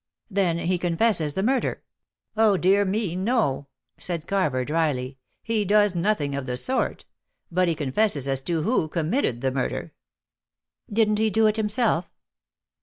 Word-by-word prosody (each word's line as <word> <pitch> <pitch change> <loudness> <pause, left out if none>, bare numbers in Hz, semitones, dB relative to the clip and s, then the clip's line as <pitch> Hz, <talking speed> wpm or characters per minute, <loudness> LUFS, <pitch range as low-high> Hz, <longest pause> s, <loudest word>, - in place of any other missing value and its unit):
"Then 185 -4 +1
he 175 +1 -1
confesses 170 -3 +1
the 190 - 0
murder?" 255 +3 0 0.5
"Oh 215 -3 +4
dear 195 +3 +3
me, 195 -2 -1
no!" 185 - 0 0.3
said 170 -3 -3
Carver 150 -11 0
dryly; 140 -4 -1 0.2
"he 225 -2 0
does 205 0 +3
nothing 170 -5 0
of 140 -1 -4
the 125 0 -2
sort; 255 - 0 0.5
but 180 +1 +2
he 165 - +1
confesses 145 0 0
as 135 -1 0
to 165 +1 -1
who 220 -5 +1
committed 155 - -1
the 135 -1 0
murder." 130 -1 -3 1.0
"Didn't 215 0 +2
he 220 0 +2
do 220 +2 +2
it 215 0 +3
himself?" 210 -4 0
180 Hz, 150 wpm, -24 LUFS, 150-215 Hz, 1.0 s, Oh